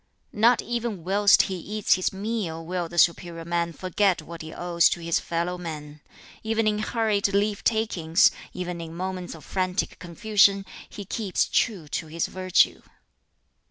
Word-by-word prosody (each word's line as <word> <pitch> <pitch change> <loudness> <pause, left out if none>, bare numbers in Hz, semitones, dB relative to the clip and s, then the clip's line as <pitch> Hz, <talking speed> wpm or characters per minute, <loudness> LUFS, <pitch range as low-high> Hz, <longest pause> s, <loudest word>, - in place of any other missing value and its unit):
"Not 230 +3 +4
even 235 -6 -3
whilst 200 +3 +5
he 190 - -3
eats 210 +4 0
his 185 - 0
meal 195 -5 -4
will 175 -1 -3
the 175 - -9
'superior 170 -1 +2
man' 170 0 -1
forget 185 +2 +1
what 165 +1 -9
he 160 0 -8
owes 170 0 +2
to - - -2
his 170 0 0
fellow 175 +1 -2
men. 150 -3 -7 0.4
Even 225 0 0
in 210 0 +1
hurried 215 -2 +1
leave 205 +1 0
takings, 190 -7 +3 0.2
even 180 -1 -5
in 165 0 -8
moments 185 -1 -4
of 155 - -13
frantic 185 0 -2
confusion, 195 +2 +2 0.2
he 205 - -8
keeps 200 -1 -1
true 195 -10 0
to 160 +2 -4
this 165 +1 -1
virtue. 185 -1 +2
185 Hz, 160 wpm, -25 LUFS, 170-205 Hz, 0.4 s, whilst